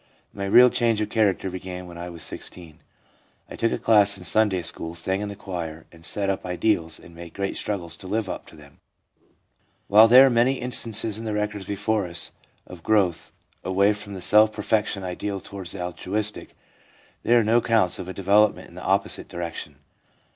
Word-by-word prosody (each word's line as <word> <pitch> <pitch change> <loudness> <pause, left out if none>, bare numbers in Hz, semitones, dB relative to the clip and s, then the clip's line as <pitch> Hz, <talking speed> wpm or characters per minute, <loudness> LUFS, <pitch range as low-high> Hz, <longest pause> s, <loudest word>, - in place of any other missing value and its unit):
My 100 - -4
real 125 +5 +7
change 115 -3 +1
of 105 0 -2
character 100 -4 +1
began 90 0 -7
when 85 -1 -11
I 85 +1 -7
was 85 -2 -9
16. 85 -4 -9 0.7
I - - -6
took 115 - 0
a - - -1
class 100 -3 +4
in 90 - -11
Sunday 95 -2 +1
school, 80 0 -4
sang 95 +3 -2
in 105 - -4
the 100 - -7
choir, 85 -6 -6
and 85 -1 -17
set 100 +3 -1
up 95 0 -1
ideals 90 -3 -1
and 85 - -15
made 85 0 -11
great 100 -1 -3
struggles 85 -5 -3
to 95 - -8
live 105 +1 -1
up - - -6
to - - -14
them/ 70 -2 -17 1.1
While 110 +3 +7
there 130 +4 +9
are 135 - +3
many 120 +3 +3
instances 115 -4 0
in 115 - -7
the 110 - -2
records 105 -2 -3
before 105 0 -1
us 85 0 -4 0.3
of 90 -2 -12
growth 95 -4 +1 0.3
away 100 +3 +2
from 105 -1 -8
the 95 - -7
self 105 +4 +5
perfection 105 -2 -1
ideal 95 +2 -4
towards 95 -1 -8
the 95 -3 -5
altruistic, 105 +4 -4 0.7
there 120 0 +4
are - - +2
no 110 +2 +3
accounts 115 -6 +2
of 90 - -6
a - - -5
development 100 +2 +2
in - - -18
the - - -9
opposite - - 0
direction. 85 -1 -6
100 Hz, 195 wpm, -24 LUFS, 90-110 Hz, 1.1 s, there